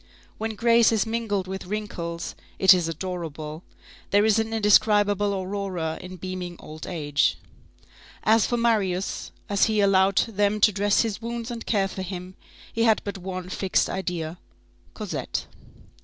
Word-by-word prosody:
When 220 0 -3
grace 230 +1 +5
is 220 -1 +2
mingled 220 -4 -1
with 190 0 -6
wrinkles, 180 -5 -4 0.2
it 190 0 +8
is 175 -3 +1
adorable. 165 -2 -5 0.5
There 205 +1 +4
is 220 0 +4
an 225 0 -1
indescribable 205 -1 +4
aurora 185 -4 -3
in 185 +1 -8
beaming 185 -1 -5
old 155 +1 -9
age. 145 -5 +1 0.9
As 220 0 +4
for 240 - 0
Marius, 200 -6 0 0.2
as 200 -1 +3
he 220 -1 +1
allowed 195 -1 +4
them 205 -1 +2
to 215 - +6
dress 205 +1 +2
his 225 -2 -2
wounds 235 +1 -4
and 235 -1 -6
care 200 -3 +2
for 190 - -6
him, 185 0 -6 0.4
he 230 - -1
had 225 -2 +4
but 200 -1 -5
one 185 0 -5
fixed 190 0 +1
idea: 175 -3 -3 0.6
Cosette. - - -4
195 Hz, 150 wpm, -25 LUFS, 180-215 Hz, 0.9 s, it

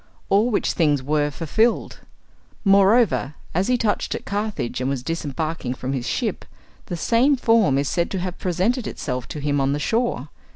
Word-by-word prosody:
All 205 +5 +4
which 215 - +1
things 145 -5 +2
were 145 +1 +1
fulfilled. 220 +10 0 0.7
Moreover, 195 - +4 0.2
as 185 +3 +1
he 250 0 +3
touched 220 -3 -1
at - - -7
Carthage, 205 - -3
and 130 - 0
was 135 -3 -2
disembarking 155 -3 -3
from 130 +1 -4
his 125 -3 -3
ship, - - -2 0.4
the 175 - -4
same 235 - +3
form 225 - +3
is 140 0 0
said 170 +3 0
to 190 - -3
have 180 0 -4
presented 200 +8 0
itself 125 -3 -4
to 150 - -6
him 145 -1 0
on 135 +1 +1
the 145 - -2
shore. 220 - -1
170 Hz, 175 wpm, -22 LUFS, 140-215 Hz, 0.7 s, All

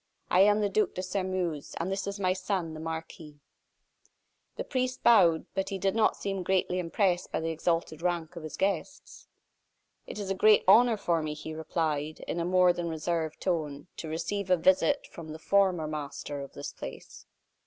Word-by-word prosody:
I 180 - +4
am 205 +2 +5
the 205 - +2
Duc 205 -1 +1
de 185 - -3
Sairmeuse, 185 -5 -2
and 175 +3 -2
this 195 0 -2
is 200 0 -4
my 185 -2 +2
son, 185 -3 -2
the 155 - -7
Marquis." 160 -2 -7 1.2
The - - -3
priest 255 -1 -2
bowed, 170 -9 +5
but 195 0 -1
he 195 - -3
did 190 +1 0
not 225 -1 +3
seem 195 -1 -3
very 185 - -3
greatly 185 0 +1
impressed 180 +1 0
by - - -1
the 165 0 -2
exalted 165 -1 -1
rank 175 -1 -2
of 170 - -7
his 155 -1 -7
guests. 195 - -3 0.8
"It - - -7
is 200 -2 -3
a - - +3
great 210 +2 +5
honor 225 +3 +6
for 170 -5 0
me," 155 -1 -3
he 155 +1 -7
replied, 155 -1 -2
in 170 - -4
a 170 - -1
more 180 0 +4
than 175 -1 -3
reserved 160 0 -2
tone, 155 -3 -2
"to 160 - -6
receive 190 +5 -3
a 180 - +5
visit 280 - +3
from 165 -2 -9
the - - -7
former 185 -1 +2
master 145 -1 -5
of 140 - -9
this 70 - -7
place." - - -10
175 Hz, 195 wpm, -29 LUFS, 160-195 Hz, 1.2 s, honor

